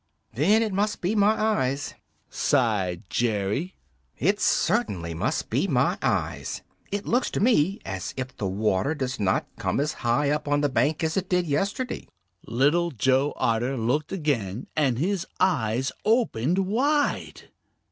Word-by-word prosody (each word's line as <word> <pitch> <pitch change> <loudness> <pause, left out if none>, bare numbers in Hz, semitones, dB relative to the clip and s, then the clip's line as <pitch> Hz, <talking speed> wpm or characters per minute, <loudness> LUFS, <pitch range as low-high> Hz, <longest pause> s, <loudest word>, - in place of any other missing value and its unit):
"Then 195 - +3
it 215 -3 -2
must 205 +2 0
be 180 +4 0
my 215 +1 +3
eyes," 145 -11 0 0.3
sighed 105 -9 0
Jerry. 110 - -1 0.4
"It 195 - +1
certainly 95 - +1
must 80 - -2
be - - +1
my - - +1
eyes. - - -2 0.3
It 205 0 -3
looks 245 +2 +1
to - - -3
me 200 -4 +3
as 95 -2 -4
if 130 -1 -5
the 100 - -3
water 100 +7 0
does 130 -5 -3
not 95 -2 +1
come - - 0
as 150 +2 0
high 125 +4 +2
up 150 0 -1
on 145 0 +2
the 145 - +2
bank 150 +4 +1
as 160 +2 0
it 190 -1 -2
did 180 -1 +2
yesterday." 200 - -2 0.4
Little 145 +9 +2
Joe 135 +2 +1
Otter 120 +4 0
looked 125 +7 0
again 130 - -2
and 135 -6 +2
his 185 +5 -1
eyes 130 - +1
opened 190 - +2
wide. 285 +9 0
145 Hz, 150 wpm, -25 LUFS, 115-195 Hz, 0.4 s, Then